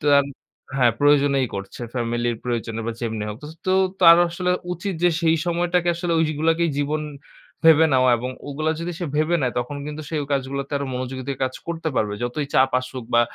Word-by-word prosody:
তো 150 - -5 0.7
হ্যাঁ, 120 -3 +4
প্রয়োজনেই 145 -2 +3
করছে। 100 +4 -7
ফ্যামিলি 120 0 -1 0.2
প্রয়োজনে 115 -2 -3
বা 115 - -1
যেমনি 110 -3 -3
হোক। 105 - -5 0.3
তো - - +2 0.3
তার 170 -2 +9
আসলে 180 +2 -2 0.2
উচিত 180 +2 -4
যে - - +7
সেই 165 0 +4
সময়টাকে 175 0 +1
আসলে 170 0 -2
ঐগুলাকেই 160 +2 +1
জীবন 150 +2 -1 0.6
ভেবে 160 0 +7
নেওয়া 130 -1 +4
এবং 125 +2 -4 0.2
ওগুলা 155 +3 -1
যদি 175 +1 -3
সে 175 - -1
ভেবে 155 +3 +2
নেয় 125 -2 0
তখন 125 +4 -4
কিন্তু 150 +1 -6
সে - - -6
ঐ - - -4
কাজগুলাতে 140 +1 -2
আরো 140 - -3
মনোযোগিতা 130 +2 -4
কাজ 130 - -3
করতে 165 -1 -3
পারবে। 105 -1 +1
যতই 125 +4 -2
চাপ 130 0 +4
আসুক 130 -1 -7
বা 120 - +6
140 Hz, 185 wpm, -22 LUFS, 125-165 Hz, 0.7 s, তার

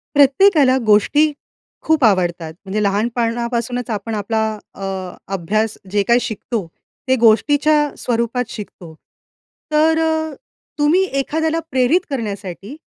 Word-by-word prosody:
प्रत्येकाला 285 -1 +5
गोष्टी 290 +9 +4 0.5
खूप 315 -3 +2
आवडतात. 175 -6 +1
म्हणजे 210 +2 -2
लहानपाणापासूनच 235 +3 -1
आपण 220 +1 -3
आपला 220 +2 -1 0.3
अ, - - -13 0.5
अभ्यास 215 +4 -1
जे 205 0 +2
काही 235 +1 +4
शिकतो 220 -2 -4 0.4
ते 260 - +4
गोष्टीच्या 290 +6 +3
स्वरूपात 235 +1 -1
शिकतो. 185 -6 -9 0.8
तर 315 +1 +3
अ, 315 -1 0 0.5
तुम्ही 310 +6 +3 0.2
एखाद्याला 320 +3 -1
प्रेरित 260 +7 +3
करण्यासाठी 205 -3 -5
235 Hz, 105 wpm, -18 LUFS, 210-295 Hz, 0.8 s, प्रत्येकाला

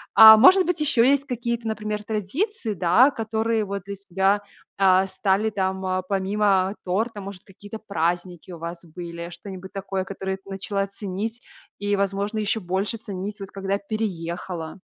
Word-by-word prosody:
А 220 0 +12
может 370 - +7
быть, 355 -1 -1
еще 255 -5 +4
есть 280 0 +2
какие-то, 235 -3 -3
например, 215 -1 -3
традиции, 220 - -2
да, 190 - +5
которые 225 -2 -1
вот 200 -1 -4
для 200 0 -5
тебя, 195 +1 +1 0.4
а, 190 -1 +5
стали 195 +3 0
там, 190 -2 -1
помимо 195 0 +1
торта? 210 +4 -1
Может, 195 -2 -8
какие-то 205 +3 -10
праздники 175 -2 -2
у 175 - -7
вас 170 +1 -7
были, 170 0 -7
что-нибудь 190 +1 -9
такое, 195 -1 -3
которое 190 0 -4
ты 195 - -18
начала 195 +1 -2
ценить 205 +4 -5 0.4
и, 205 0 0
возможно, 200 +2 -1
ещё 215 +1 0
больше 190 +5 -2
ценить, 205 -1 -6
вот 195 -1 -8
когда 195 0 -2
переехала? 180 -5 -4
200 Hz, 155 wpm, -24 LUFS, 190-220 Hz, 0.4 s, А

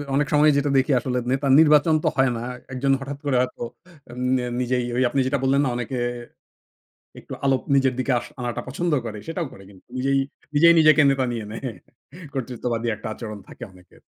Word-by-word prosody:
অনেক 145 +1 +1
সময় 150 +1 +5
যেটা 145 +1 +1
দেখি, 135 +3 +2
আসলে 125 0 -2
নেতা 135 +2 0
নির্বাচন 155 0 +5
তো - - +1
হয় 135 0 +4
না। - - -5 0.3
১ 130 - -5
জন 135 - +3
হঠাৎ 140 +1 -6
করে 140 -2 +1
হয়তো 125 -1 -4 0.5
এন 120 - -11 0.4
নিজেই, 125 0 0
ওই 130 - +3
আপনি 140 - -1
যেটা 140 0 0
বললেন 135 +1 +3
না? - - +1
অনেকে 125 +1 -4 1.2
একটু - - -10
আলো 135 -1 +4 0.2
নিজের 135 -1 +3
দিকে 130 +2 0
আস - - -9
আনাটা 120 -1 -3
পছন্দ 170 +6 -2
করে, 110 -2 -5
সেটাও 165 0 -3
করে 95 - -13
কিন্তু। 95 -2 -18
নিজেই, 135 +1 +1 0.4
নিজেই, 170 +3 +7
নিজেকে 155 0 +6
নেতা 135 -1 0
নিয়ে 115 -3 -4
নেয়। 115 +4 -5 0.7
কর্তৃত্ববাদী 120 -2 -3
একটা 110 - -8
আচরণ 110 -2 -7
থাকে - - -11
অনেকের। 90 -1 -20
130 Hz, 190 wpm, -23 LUFS, 120-145 Hz, 1.2 s, নিজেই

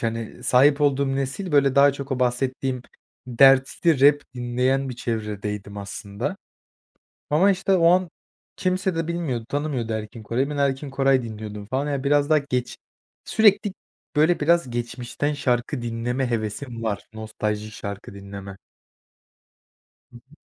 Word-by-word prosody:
hani, 115 -1 -4
sahip 140 +3 +4
olduğum 140 -1 +2
nesil, 140 +6 -3
böyle, 140 -1 +4
daha 140 0 +6
çok 140 0 -6
o 130 - -2
bahsettiğim 125 +1 -1 0.4
dertli 135 +4 +4
rap 145 +1 +6
dinleyen 125 +2 0
bir 125 - -6
çevredeydim 105 -3 -4
aslında. 100 - -5 0.9
Ama, 180 +7 +4
işte, 195 0 0
o 170 -2 +4
an 180 -1 +3 0.5
kimse 185 -1 0
de 165 -1 -2
bilmiyordu, 155 -10 -2
tanımıyordu 140 -6 -2
Erkin 110 +1 -6
Koray'ı. 130 +6 -1
Ben, 150 - -4
Erkin 140 0 0
Koray 135 -1 +2
dinliyordum 105 -2 -7
falan. 135 +6 -2
Ya, 140 -1 -2
biraz 145 +1 +2
daha 155 - +5
geç 125 -3 -3 0.5
sürekli, 210 -2 +3 0.4
böyle, 160 +4 +3
biraz 170 -2 +2
geçmişten 120 +4 -3
şarkı 120 -3 -1
dinleme 120 +2 -2
hevesim 115 +2 -4
var, 105 -2 -2
nostalji 110 -1 -4
şarkı 100 -2 -7
dinleme. 100 0 -9 1.5
Hı - - -18
hı. 135 +5 -17
130 Hz, 140 wpm, -24 LUFS, 115-145 Hz, 1.5 s, daha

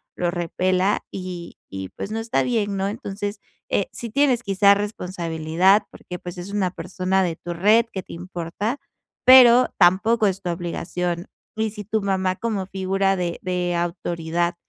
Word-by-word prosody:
lo 175 -1 0
repela 185 +3 0
y 180 -2 -7
y 95 -1 -6
pues - - -7
no 220 - -2
está 225 +2 0
bien, 215 -5 0
¿no? 195 +1 0
Entonces, 205 -2 -5 0.3
eh, - - +1
sí 235 - -6
tienes 255 0 +2
quizá 200 -1 +5
responsabilidad, 180 -2 +1
porque 180 - -8
pues 175 +1 -8
es 175 +3 -7
una 195 -3 0
persona 190 +1 -1
de 170 -3 -1
tu 175 - -6
red 210 +7 +4
que 190 - -3
te - - -11
importa, 180 - -4 0.5
pero 250 -1 +8
tampoco 205 +5 +4
es 195 0 -2
tu 180 - -3
obligación. 175 +1 -3 0.3
Y 220 0 0
si 210 0 -7
tu 220 +2 -1
mamá 190 -2 0
como 215 -4 -2
figura 195 0 0
de 175 -2 -2
de 180 -1 -1
autoridad 170 0 -2
190 Hz, 165 wpm, -23 LUFS, 175-210 Hz, 0.5 s, pero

